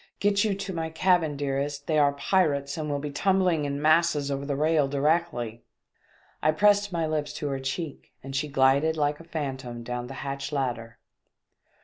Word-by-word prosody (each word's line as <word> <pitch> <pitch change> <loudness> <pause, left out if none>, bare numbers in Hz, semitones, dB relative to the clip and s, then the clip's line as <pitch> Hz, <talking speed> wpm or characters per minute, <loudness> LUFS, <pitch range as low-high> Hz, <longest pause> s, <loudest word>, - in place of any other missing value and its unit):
"Get 205 0 +3
you 210 -3 +1
to 195 -1 -5
my 165 -1 -3
cabin, 160 -3 +2
dearest, 140 0 -2
they 155 -2 +2
are 145 -1 +4
pirates 140 -3 +1
and 155 -2 -4
will 145 - 0
be 145 +1 -5
tumbling 185 -2 +2
in 140 0 -2
masses 155 -2 +3
over 140 0 -3
the 140 - -1
rail 155 0 +2
directly." 140 -5 0 0.8
I 155 - +3
pressed 205 +3 +3
my 165 -2 0
lips 155 -1 -2
to 145 - -3
her 135 -1 -2
cheek 140 +3 -5
and 135 0 -7
she 140 +3 0
glided 140 +3 +3
like 145 0 0
a - - -11
phantom 130 -7 -5
down 125 0 -4
the 135 - -8
hatch 140 +1 -4
ladder. 120 -5 -3
145 Hz, 185 wpm, -27 LUFS, 140-165 Hz, 0.8 s, are